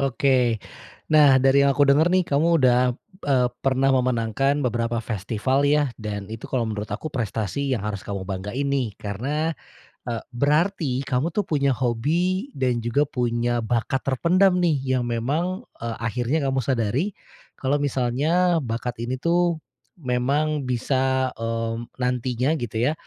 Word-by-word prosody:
Oke, 130 -4 +2 0.5
nah 145 -3 +7
dari 135 +1 +4
yang 140 - +4
aku 145 - +5
dengar 150 +5 +5
nih 185 - +4
kamu 165 +3 +2
udah 125 -1 +4 0.4
eee, 130 -3 +3 0.2
pernah 135 0 +2
memenangkan 130 +2 +1
beberapa 115 -1 -1
festival 115 +6 -1
ya, 150 -1 +3
dan 105 -2 -5
itu 115 - -8
kalo 125 -3 0
menurut 105 -1 -4
aku 135 +9 -4
prestasi 115 +3 -2
yang 120 - 0
harus 105 -2 -3
kamu 100 -2 -4
banggain 105 +9 -3
nih. 130 -6 0
Karena, 140 +11 -2 0.5
e 120 - -2 0.2
berarti 150 0 +1
kamu 140 +6 0
tuh 205 -3 0
punya 140 -3 +1
hobi, 165 - 0
dan 125 -2 0
juga 125 +6 +1
punya 120 -2 -1
bakat 120 +3 -1
terpendam 180 +7 +3
nih, 170 -5 +2 0.2
yang 120 - -2
memang, 155 - -1 0.2
e 115 - -6 0.2
akhirnya 125 +6 -1
kamu 135 - 0
sadari, 130 - 0 0.4
kalo 140 +2 +1
misalnya 145 +6 +1
bakat 120 0 -4
ini 125 +2 -2
tuh, 170 +2 +1 0.4
memang 140 +3 0
bisa, 130 +1 0
eee, 115 0 -2 0.3
nantinya 125 +3 0
gitu 115 -3 -5
ya, - - 0
130 Hz, 145 wpm, -23 LUFS, 120-145 Hz, 0.5 s, nah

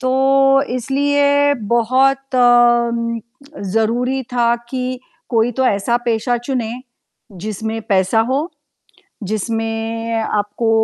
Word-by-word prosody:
तो, 270 +1 +3
इसलिए 285 +3 +1 0.2
बहुत 265 +3 +2
अ, 240 -1 +4
म 230 0 -3 0.5
ज़रूरी 245 +4 0
था 235 -1 +2
कि 255 0 -3 0.4
कोई 230 -1 +2
तो 260 - +2
ऐसा 205 +2 +1
पेशा 235 +1 0
चुने, 245 -5 -2 0.7
जिसमें 220 +1 -4
पैसा 190 +2 +2
हो, 270 +2 +1 0.9
जिसमें 225 +1 -3
आपको 210 +1 -1
240 Hz, 100 wpm, -18 LUFS, 225-265 Hz, 0.9 s, अ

